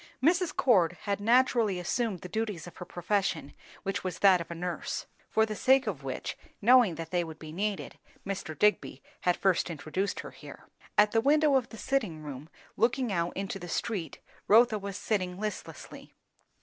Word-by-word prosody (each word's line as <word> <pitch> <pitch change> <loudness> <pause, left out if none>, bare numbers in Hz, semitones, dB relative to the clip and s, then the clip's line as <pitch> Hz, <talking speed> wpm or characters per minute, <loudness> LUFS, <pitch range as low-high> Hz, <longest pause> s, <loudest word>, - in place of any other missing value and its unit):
Mrs. 345 +5 +2
Cord 180 -10 +4
had 200 -1 -1
naturally 230 -3 +3
assumed 195 +1 -1
the - - -7
duties 210 -3 -3
of 175 - -12
her 180 - -7
profession, 175 -5 -1 0.3
which 195 0 -2
was 185 -1 -3
that 190 -3 +5
of 170 - -8
a 170 - -5
nurse; 175 +1 -4 0.2
for 220 - +3
the 215 -1 -5
sake 265 +4 +4
of 175 -10 -4
which, 135 -1 -4 0.2
knowing 235 -5 +5
that 165 0 -7
they 175 -1 +1
would 160 -2 -8
be 155 -1 -9
needed, 200 +4 -3 0.3
Mr. 185 -6 -4
Digby 210 -9 +1 0.2
had 180 -1 +1
first 190 -2 +2
introduced 165 +5 -3
her - - -9
here. - - -12 0.3
At 210 0 +6
the 225 - +3
window 295 +3 +4
of 255 -3 +1
the 225 - -10
sitting 210 - -1
room, 145 +1 -8 0.3
looking 240 -1 +1
out 170 -1 -1
into 195 0 -3
the 175 - -8
street, 180 - -3 0.3
Rotha 225 0 +5
was 200 0 -5
sitting 185 -4 -2
listlessly. 215 0 -7
195 Hz, 180 wpm, -29 LUFS, 175-225 Hz, 0.3 s, At